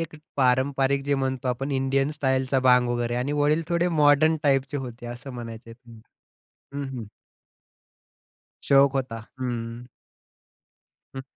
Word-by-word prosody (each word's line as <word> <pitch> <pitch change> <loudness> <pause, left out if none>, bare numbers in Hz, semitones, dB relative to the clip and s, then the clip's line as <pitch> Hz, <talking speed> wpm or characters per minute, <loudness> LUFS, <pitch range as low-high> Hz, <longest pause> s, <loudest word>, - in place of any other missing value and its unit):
एक 165 -1 -5 0.2
पारंपरिक 135 +1 +2
जे 140 0 +1
म्हणतो, 130 -1 -2
आपण 135 +3 -2
इंडियन 135 +1 +1
स्टाईलचा 130 -2 0
भांग 125 -1 +4
वगैरे 120 0 -1
आणि 125 +4 -1
वडील 150 +2 +2
थोडे 170 +1 +1
मॉडर्न 155 0 +4
टाइपचे 135 0 +1
होते 120 -3 -7
असं 120 +3 -8
म्हणायचे. 115 -1 -8 1.0
हं, 140 - -3
हं. 115 - -6 1.6
शौक 140 0 +5
होता. 125 -4 -2 0.2
हं. 120 -1 -4 1.3
हं. 135 - -5
135 Hz, 120 wpm, -25 LUFS, 125-140 Hz, 1.6 s, शौक